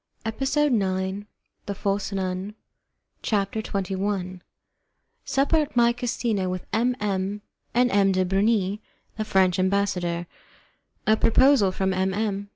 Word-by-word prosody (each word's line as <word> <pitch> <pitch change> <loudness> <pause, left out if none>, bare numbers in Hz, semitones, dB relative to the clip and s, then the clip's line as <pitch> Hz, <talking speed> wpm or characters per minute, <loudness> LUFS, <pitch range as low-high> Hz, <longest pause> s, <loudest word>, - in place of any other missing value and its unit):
EPISODE 270 +6 +1
9 190 -1 -1 0.4
THE 200 - -3
FALSE 200 +1 -2
NUN 190 +1 -3 0.7
CHAPTER 205 0 -1
XXI 190 -2 -3 0.9
Supper 275 +4 +2
at 300 -3 -1
My 235 0 +4
Casino 230 -5 -1
With 185 0 -4
M. 245 +2 +2
M. 200 0 -2 0.3
and 245 0 +3
M. 195 -1 +4
de 185 0 +1
Bernis, 200 +1 +1 0.4
the 215 - -1
French 190 -2 +2
Ambassador 185 -3 0 0.8
A 215 - +5
Proposal 250 -4 +4
from 190 0 -1
M. 190 0 0
M. 200 -2 -2
200 Hz, 125 wpm, -25 LUFS, 190-220 Hz, 0.9 s, A